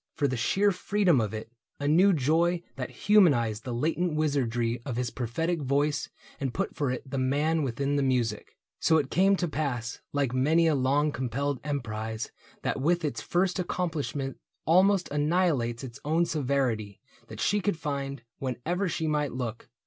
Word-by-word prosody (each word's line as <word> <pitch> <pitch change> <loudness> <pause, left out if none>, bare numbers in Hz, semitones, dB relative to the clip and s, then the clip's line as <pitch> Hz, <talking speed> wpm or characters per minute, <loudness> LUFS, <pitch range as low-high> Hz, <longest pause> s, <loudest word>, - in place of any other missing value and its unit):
For 145 - +1
the 130 - -1
sheer 195 - +2
freedom 185 - +2
of 105 -2 -2
it 110 +1 -6
— - - -51
a 145 - -1
new 180 +7 +5
joy 170 +3 +2
That 130 -2 -4
humanized 125 - +3
the 125 - -3
latent 160 +7 0
wizardry 120 -6 0
Of 125 -2 -4
his 125 0 -2
prophetic 160 +8 -2
voice 145 +2 0 0.3
and 135 -4 -3
put 195 - -2
for 145 -4 0
it 125 +2 -4
The 135 +1 -3
man 145 +5 +1
within 140 +2 -1
the - - +2
music. 125 -5 -1 0.2
So 160 - +4
it 140 -3 -1
came 195 +2 +4
To 180 -2 -1
pass, 135 -6 -3
like 140 -3 0
many 155 +6 +3
a 160 - +4
long 140 +2 +2
compelled 130 +1 -2
emprise 110 -6 -3 0.3
That - - -1
with 170 +3 +2
its 120 -7 -2
first 180 - 0
accomplishment 155 -7 -2 0.3
almost 185 +3 +4
Annihilates 145 -6 +1
its 120 -3 -8
own 160 +3 +2
severity, 130 - -1 0.3
That - - -9
she 205 0 +2
could 205 -4 0
find, 140 -4 -4 0.2
whenever 160 +9 -2
she 160 0 -2
might 150 -2 0
look. 120 -2 -5
145 Hz, 170 wpm, -28 LUFS, 125-165 Hz, 0.3 s, new